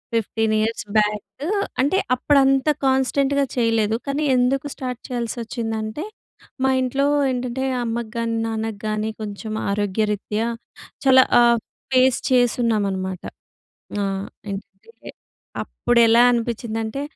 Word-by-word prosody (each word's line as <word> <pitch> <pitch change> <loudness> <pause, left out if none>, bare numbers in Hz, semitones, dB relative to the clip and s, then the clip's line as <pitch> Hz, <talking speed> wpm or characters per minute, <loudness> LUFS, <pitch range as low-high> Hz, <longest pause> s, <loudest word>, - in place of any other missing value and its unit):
15 225 0 0
years 225 +1 -1
back 210 +5 -1 0.4
అంటే 290 +8 +2 0.2
అప్పుడంత 270 +1 +3 0.2
కాన్‌స్టెంట్‌గా 270 +1 +2
చేయలేదు. 225 -3 +2
కానీ 280 +2 -1
ఎందుకు 255 +3 +1
స్టార్ట్ 250 -2 -5
చేయాల్సోచ్చిందంటే, 230 0 -3 0.6
మా - - +4
ఇంట్లో 270 +2 0 0.3
ఏంటంటే 250 +1 -3 0.2
అమ్మకు 230 -1 -3
గానీ, 230 0 -1
నాన్నకి 220 -2 -3
గాని 215 +1 -1
కొంచెం 215 +1 -5 0.2
ఆరోగ్యరీత్యా, 210 +2 -1 0.6
చాలా 260 -1 +7 0.2
ఆహ్, 235 -1 +5 0.3
ఫేస్ 255 0 +4
చేసున్నామనమాట. 210 -7 +1 0.8
ఆహ్, 195 0 -2 0.2
ఏంటంటే, 200 0 -5 0.9
అప్పుడెలా 235 -1 +3
అనిపించిందంటే 230 +1 -2
230 Hz, 100 wpm, -22 LUFS, 215-255 Hz, 0.9 s, చాలా